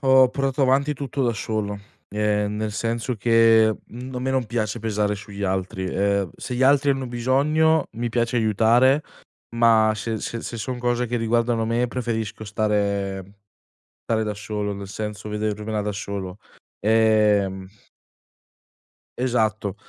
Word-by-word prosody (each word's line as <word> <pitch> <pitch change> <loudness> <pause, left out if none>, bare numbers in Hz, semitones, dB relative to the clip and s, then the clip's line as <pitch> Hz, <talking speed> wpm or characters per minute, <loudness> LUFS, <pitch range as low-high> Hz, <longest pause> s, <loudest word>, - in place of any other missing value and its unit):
ho 130 -1 +6
portato 135 +1 -1
avanti 140 +3 +2
tutto 140 0 -3
da 120 - +2
solo, 105 -1 -3 0.3
ehm, 105 0 0
nel 110 0 -2
senso 115 +3 -2
che, 115 0 +4
mhmm, 125 +2 -9
a - - -2
me 130 +1 -1
non 130 -2 +1
piace 110 0 -2
pesare 105 -2 -1
sugli 100 0 -9
altri. 95 0 -2
Ehm, 100 -1 0
se 125 - -5
gli 125 - 0
altri 140 +1 +4
hanno 135 -1 -1
bisogno, 145 +6 +2
mi 120 +1 -3
piace 120 +1 0
aiutare, 115 +6 +4 0.5
ma 110 -2 +5
se 110 +1 -3
se 115 +2 -5
se 120 - -6
son 125 +2 -4
cose 120 0 0
che 120 +1 -2
riguardano 115 0 +1
me, 120 +1 0
preferisco 115 -4 -3
stare 100 -2 -1 0.8
stare 110 -1 +1
da 105 -1 -2
solo, 105 -1 -3
nel 100 0 -7
senso 105 +1 -6
vedermela 105 0 -2
da 105 0 -2
solo. 100 -2 -5 0.4
Ehm 105 -3 +2 1.5
Esatto. 110 -5 0
110 Hz, 145 wpm, -23 LUFS, 105-125 Hz, 1.5 s, ho